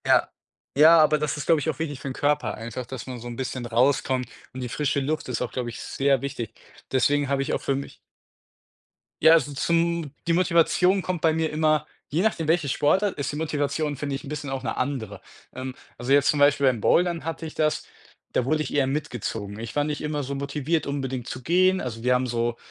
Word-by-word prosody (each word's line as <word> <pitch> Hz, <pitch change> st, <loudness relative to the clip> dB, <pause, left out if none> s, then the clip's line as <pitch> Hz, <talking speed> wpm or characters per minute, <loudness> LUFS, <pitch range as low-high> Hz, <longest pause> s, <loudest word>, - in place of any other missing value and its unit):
Ja. -, -, +4 dB, 0.5 s
Ja, 160 Hz, +3 st, +8 dB
aber 155 Hz, 0 st, +5 dB
das 150 Hz, -1 st, -1 dB
ist, 145 Hz, -, -5 dB
glaube 165 Hz, -2 st, +5 dB
ich, 145 Hz, -, -2 dB
auch 155 Hz, -, -3 dB
wichtig 145 Hz, -4 st, -3 dB
für -, -, -7 dB
'n 135 Hz, -, -3 dB
Körper 145 Hz, -5 st, 0 dB
einfach, 115 Hz, +2 st, -6 dB
dass 130 Hz, 0 st, -7 dB
man 125 Hz, -2 st, -6 dB
so 120 Hz, -, -8 dB
'n 120 Hz, -, -6 dB
bisschen 130 Hz, -1 st, -4 dB
rauskommt 125 Hz, +1 st, +1 dB, 0.2 s
und 130 Hz, -, -6 dB
die 125 Hz, -, -4 dB
frische 145 Hz, +1 st, 0 dB
Luft 155 Hz, +3 st, -2 dB
ist 125 Hz, -, -3 dB
auch, -, -, -2 dB
glaube 125 Hz, -2 st, -3 dB
ich, 115 Hz, -, -8 dB
sehr 135 Hz, -2 st, +1 dB
wichtig. 125 Hz, -6 st, -5 dB, 0.4 s
Deswegen 145 Hz, +2 st, +2 dB
habe 135 Hz, 0 st, 0 dB
ich 135 Hz, -, -2 dB
auch -, -, -1 dB
für 135 Hz, -, 0 dB
mich 140 Hz, -, -6 dB, 1.3 s
Ja, 160 Hz, -, +9 dB
also, 155 Hz, -3 st, +3 dB
zum 170 Hz, +1 st, 0 dB, 0.2 s
die 170 Hz, -, +3 dB
Motivation 180 Hz, +2 st, +3 dB
kommt 180 Hz, -3 st, -2 dB
bei 160 Hz, -, +4 dB
mir 160 Hz, 0 st, 0 dB
immer 155 Hz, -1 st, +2 dB, 0.2 s
je 160 Hz, +6 st, 0 dB
nachdem, 190 Hz, -8 st, 0 dB
welche 160 Hz, -3 st, +2 dB
Sportart 185 Hz, +9 st, +2 dB
ist 140 Hz, -1 st, -2 dB
die -, -, -6 dB
Motivation, 150 Hz, -1 st, -1 dB
finde 140 Hz, 0 st, -3 dB
ich, 135 Hz, -, -6 dB
'n -, -, -9 dB
bisschen 145 Hz, -1 st, -5 dB
auch 135 Hz, -1 st, -4 dB
'ne -, -, -2 dB
andere. 125 Hz, -7 st, -3 dB, 0.3 s
Ähm, 130 Hz, 0 st, -5 dB, 0.2 s
also, 120 Hz, +3 st, -3 dB
jetzt 140 Hz, 0 st, +5 dB
zum 150 Hz, -, +2 dB
Beispiel 145 Hz, -1 st, +4 dB
beim 120 Hz, -4 st, +1 dB
Bouldern 175 Hz, +4 st, +2 dB
hatte 165 Hz, 0 st, -4 dB
ich 155 Hz, -, -7 dB
das, 155 Hz, -1 st, 0 dB, 0.5 s
da -, -, +2 dB
wurde 155 Hz, +3 st, +1 dB
ich -, -, -6 dB
eher 140 Hz, -2 st, +3 dB
mitgezogen. 115 Hz, -7 st, -4 dB
Ich 115 Hz, 0 st, -7 dB
war 145 Hz, -, +3 dB
nicht 150 Hz, 0 st, -3 dB
immer 150 Hz, -1 st, -2 dB
so 135 Hz, +1 st, -4 dB
motiviert, 145 Hz, +3 st, -1 dB
unbedingt 135 Hz, -3 st, -3 dB
zu 130 Hz, -, -6 dB
gehen. 185 Hz, +4 st, +3 dB
Also, 115 Hz, -3 st, -5 dB
wir 125 Hz, 0 st, +3 dB
haben 125 Hz, +1 st, +1 dB
so 120 Hz, 0 st, -1 dB
145 Hz, 225 wpm, -25 LUFS, 130-155 Hz, 1.3 s, Ja